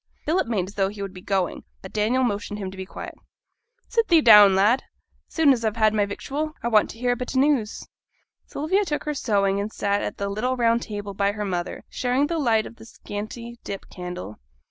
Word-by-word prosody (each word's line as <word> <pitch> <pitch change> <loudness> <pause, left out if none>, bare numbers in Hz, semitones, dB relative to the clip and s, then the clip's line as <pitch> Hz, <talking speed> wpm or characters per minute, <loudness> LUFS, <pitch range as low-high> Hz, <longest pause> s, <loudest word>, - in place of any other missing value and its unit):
Philip 325 -3 +1
made 200 -6 -1
as 195 - -10
though 195 -2 +1
he 200 0 -7
would 195 -1 -6
be 185 - -10
going, 190 -2 -1 0.2
but 190 - -10
Daniel 225 +5 +1
motioned 205 -2 -2
to 210 - -6
him 185 - -5
to - - -11
be 190 0 -6
quiet. - - -8 0.7
'Sit 460 -1 +1
thee 335 -4 +6
down, 210 -7 +8
lad. 210 +7 +4 0.5
As - - -21
soon 310 -4 +5
as 235 -3 -3
I've 220 -2 0
had 215 -2 +3
my 205 -1 +1
victual, 300 +9 -4
I 235 - 0
want 215 -2 +4
t' - - -9
hear 245 0 +1
a - - +1
bit 250 +2 -4
o' - - +5
news.' 265 -6 +1 0.6
Sylvia 375 +8 0
took 300 -6 -3
her 300 - -2
sewing 200 -7 +1
and 205 +2 -3
sat 200 -1 0
at - - -4
the 200 - -2
little 230 +6 -1
round 235 -1 +2
table 205 -2 -6
by 200 +1 +1
her 210 0 -4
mother, 180 -2 -3
sharing 255 +3 0
the 330 +2 -2
light 225 -6 +2
of 235 - -11
the 225 - -13
scanty 230 +3 -7
dip 195 - -7
candle. 180 - -7
215 Hz, 235 wpm, -24 LUFS, 200-255 Hz, 0.7 s, down